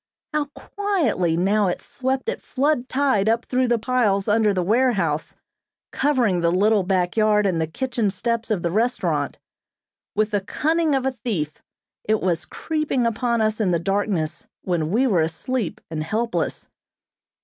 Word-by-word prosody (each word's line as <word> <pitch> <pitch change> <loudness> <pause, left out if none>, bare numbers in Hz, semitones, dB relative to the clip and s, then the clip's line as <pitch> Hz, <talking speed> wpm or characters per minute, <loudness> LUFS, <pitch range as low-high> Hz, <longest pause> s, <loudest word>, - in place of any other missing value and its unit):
How 300 -1 +1
quietly 300 - 0
now 200 +3 +2
it 180 - -1
swept 260 - -3
at 470 - -2
flood 275 -2 0
tide 260 -7 +2
up 230 +2 +1
through 255 0 +1
the 240 0 +2
piles 220 -4 +1
under 215 0 +3
the 185 -2 0
warehouse, 200 - +1 0.6
covering 245 -11 +1
the 170 0 +2
little 205 +3 +3
back 180 -1 0
yard 215 -1 +3
and 175 -4 +1
the 160 - 0
kitchen 235 - -1
steps 230 +4 -2
of 205 -6 0
the 170 - 0
restaurant. 230 +6 0 0.8
With 215 +1 +1
the 205 -1 +1
cunning 315 - +1
of 265 -1 0
a 265 - +2
thief 195 - -4 0.4
it 215 0 +1
was 175 -2 -1
creeping 305 - -1
upon 235 0 0
us 215 0 +1
in 200 - +2
the 175 - +2
darkness 195 -3 -1 0.2
when 170 -4 -1
we 235 +8 +2
were 195 -10 +3
asleep 170 +7 -2
and 155 -1 -2
helpless. 225 +8 -2
215 Hz, 160 wpm, -23 LUFS, 185-255 Hz, 0.8 s, under